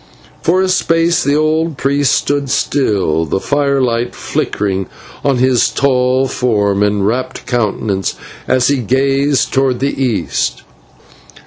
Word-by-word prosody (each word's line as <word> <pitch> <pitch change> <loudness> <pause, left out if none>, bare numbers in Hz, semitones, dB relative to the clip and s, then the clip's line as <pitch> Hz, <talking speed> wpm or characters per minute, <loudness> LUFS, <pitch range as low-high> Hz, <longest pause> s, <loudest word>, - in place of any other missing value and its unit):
Then - - -26
for 180 +3 +2
a - - +1
space 170 -2 +1
the 140 +1 +1
old 155 0 0
priest 140 0 +1
stood 140 -1 0
still, 100 - 0
the 80 +4 -2
firelight 135 -3 0
flickering 95 -2 -2 0.4
on 140 -2 +2
his 130 -1 +3
tall 130 -1 +1
form 105 -6 0
and 105 -1 +1
rapt 130 +4 -2
countenance 105 -4 -1 0.3
as 130 -1 +2
he 140 - +2
gazed 135 +2 +1
towards 135 -2 +1
the 135 +1 -1
east. 120 -5 -1
130 Hz, 130 wpm, -15 LUFS, 110-140 Hz, 0.4 s, his